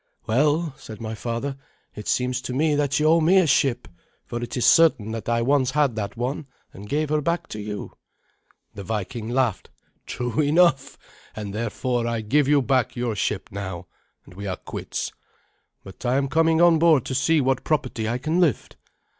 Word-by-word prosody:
"Well," 150 +6 +1
said 110 -2 -10
my 110 -1 -5
father, 120 +5 -4 0.4
"it 105 - -9
seems 125 0 0
to 130 - -5
me 150 +3 +2
that 145 -1 +1
you 150 - +1
owe 165 +2 +5
me 175 +5 +4
a 185 - +5
ship, 135 -4 +1 0.4
for 120 - -5
it 120 - -5
is 125 - +1
certain 155 -10 +4
that 115 -1 -5
I 115 0 +1
once 135 0 +2
had 145 -6 +1
that 105 +1 -4
one, 130 +4 -3 0.3
and 100 +2 -11
gave 150 +1 0
her 155 0 +2
back 170 +3 -1
to 105 - -6
you." 105 0 -6 0.8
The 100 - -8
Viking 110 +3 -4
laughed. 125 -4 0 0.4
"True 125 +3 -3
enough, 150 -2 +3 0.4
and 105 -2 -6
therefore 115 +2 -2
I 115 -1 -1
give 135 +6 +2
you 145 -1 +4
back 130 -2 +1
your 120 -3 -2
ship 100 -1 -2
now, 95 -3 -6 0.4
and - - -15
we 100 +2 -7
are 95 -3 -3
quits. - - -5 0.7
But 95 -2 -12
I 125 +1 +1
am 140 -1 0
coming 165 +2 +3
on 170 -2 +6
board 160 -6 +4
to - - -4
see 145 +5 +2
what 130 -2 0
property 125 -7 -1
I 120 - -1
can 155 +7 -1
lift." 160 - 0
125 Hz, 190 wpm, -24 LUFS, 110-150 Hz, 0.8 s, on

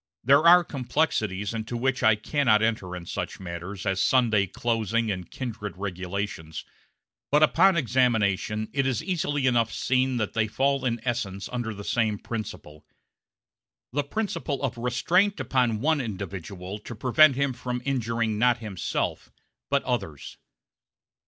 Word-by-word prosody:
There 140 +6 +5
are 175 +1 +8
complexities 115 - -1
into 115 +1 -4
which 130 +2 0
I 110 -1 +5
cannot 110 0 +2
enter 105 -5 -1
in 90 -1 -8
such - - -5
matters 90 +2 -7
as 95 -1 0
Sunday 110 -6 +3
closing 115 +1 -1
and 90 -2 -5
kindred 105 -7 -6
regulations; 95 -3 -5 0.6
but 150 +2 +4
upon 190 +4 +5
examination 110 - +1
it 135 0 +1
is 135 +3 -1
easily 155 -6 -1
enough 120 -3 +2
seen 130 0 +1
that 110 -3 -2
they 110 -1 +1
fall 135 +4 0
in 120 -2 0
essence 100 -5 -2
under 120 -2 -3
the 100 -1 -8
same 110 -1 0
principle 95 -10 -7 1.1
the 145 +2 +1
principle 145 -4 -3
of 130 -2 -1
restraint 165 - +1
upon 120 -5 +1
one 155 +1 +2
individual 95 -2 -6
to 115 - -9
prevent 135 +5 +5
him 140 -1 0
from 125 0 -4
injuring 115 -4 -1
not 120 0 +4
himself, 105 -6 -3 0.4
but 140 0 +1
others. 95 - -4
115 Hz, 140 wpm, -26 LUFS, 100-130 Hz, 1.1 s, are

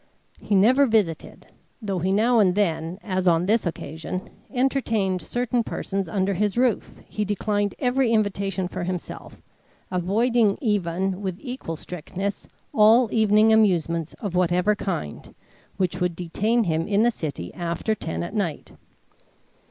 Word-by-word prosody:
He 205 - -1
never 255 +8 +5
visited. 205 -9 -1 0.3
Though 200 -5 -3
he 185 +3 0
now 225 +4 +3
and 185 -4 +4
then, 170 -3 0
as 185 -2 -1
on 170 0 +3
this 215 0 +2
occasion, 165 +2 -5 0.2
entertained 230 -8 0
certain 245 -1 -1
persons 195 -4 -3
under 195 +1 0
his 205 +3 -1
roof, 245 -3 +1 0.2
he 210 - -2
declined 205 0 -1
every 250 -1 +1
invitation 200 -3 0
for 180 - -5
himself, 180 -1 -6 0.5
avoiding 210 +4 +2
even, 190 - -1
with 190 -3 -3
equal 250 - -6
strictness, 180 +5 -5 0.3
all 220 +2 +5
evening 220 0 +4
amusements 170 -6 +2
of 200 -5 -5
whatever 180 +3 +2
kind, 175 - -5 0.4
which 180 -1 -1
would 180 -1 0
detain 210 +7 0
him 165 -3 -1
in 205 +1 +2
the 240 - +4
city 145 - -6
after 175 +5 -2
ten 165 -5 -4
at 175 - -6
night. 190 -8 -3
195 Hz, 140 wpm, -24 LUFS, 180-220 Hz, 0.5 s, never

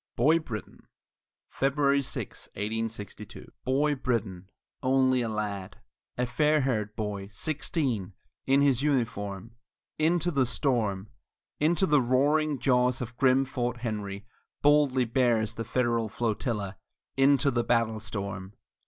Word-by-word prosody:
BOY 155 +7 +4
BRITTAN 115 -9 -8 0.6
[February 140 0 +2
6, 135 - -5
1862] 110 0 -4
I 125 - -24
Boy 145 +3 +2
Brittan 110 -9 -2 0.3
only 130 -1 +3
a 115 - -1
lad 105 -3 -4 0.4
a 125 - +1
fair 150 +4 +2
haired 110 -5 -1
boy 105 -3 -4
sixteen, 130 - -2 0.3
In 135 +1 +4
his 135 -3 +3
uniform, 115 -6 -2 0.4
Into 170 +2 +2
the 135 -5 +2
storm 110 -6 0 0.5
into 170 +5 +3
the 150 -5 +4
roaring 145 +4 +2
jaws 125 -1 +2
of 120 -1 -6
grim 130 +1 +3
Fort 120 -2 -3
Henry 105 -3 -4 0.4
Boldly 145 -3 +4
bears 115 -2 +1
the 115 - -4
Federal 115 -1 0
flotilla 105 -3 -2 0.4
Into 140 +1 +4
the 120 -1 0
battle 115 -2 +1
storm! 100 -2 -5
120 Hz, 125 wpm, -28 LUFS, 110-140 Hz, 0.6 s, BOY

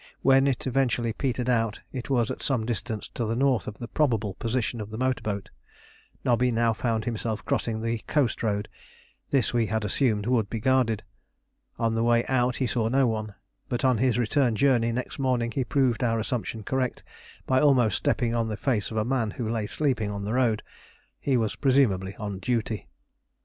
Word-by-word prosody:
When 135 +1 +5
it 130 -4 -1
eventually 125 -3 +1
petered 125 -1 -2
out 115 -3 +1
it 130 -1 -6
was 120 -4 +2
at - - -6
some 125 -6 0
distance 110 -1 -3
to 120 - -4
the 115 +1 -1
north 130 -3 +2
of 105 - -6
the 120 - -6
probable 115 -9 0
position 115 +1 -2
of 105 - -6
the 110 - -6
motor 130 +1 0
boat. 100 -2 -4 0.7
Nobby 125 +1 +3
now 115 -1 +2
found 110 -1 -1
himself 115 -2 -3
crossing 110 -2 -1
the 115 0 -1
coast 140 -7 +1
road; 105 -1 -1 0.6
this 135 -4 +2
we 115 -2 +2
had 110 +1 -1
assumed 105 -1 +1
would 115 -4 +1
be 115 - -3
guarded. 125 -3 +2 0.7
On 115 -1 +1
the 115 - 0
way 120 0 +3
out 125 -1 +1
he 130 - 0
saw 115 -2 0
no 135 +3 +3
one; 110 -3 -2 0.3
but 120 +2 -1
on 125 -4 +3
his 125 -2 +2
return 120 0 +2
journey 120 -2 +3
next 125 +4 -4
morning 125 -3 +1
he 130 +3 0
proved 130 -2 +1
our 115 -2 +2
assumption 110 0 -3
correct 130 +2 -2 0.4
by 130 0 +3
almost 125 -8 +4
stepping 120 -2 0
on 115 -1 0
the 105 -2 -3
face 115 -7 0
of 110 - -5
a 110 - +1
man 125 -3 0
who 110 +2 -4
lay 110 -2 -1
sleeping 130 -8 0
on 100 -1 -4
the 105 - -2
road. 120 -4 +2 0.6
He 135 -3 +1
was 110 -3 0
presumably 105 -9 +2
on 100 -3 -5
duty. 110 0 -2
115 Hz, 195 wpm, -26 LUFS, 110-130 Hz, 0.7 s, When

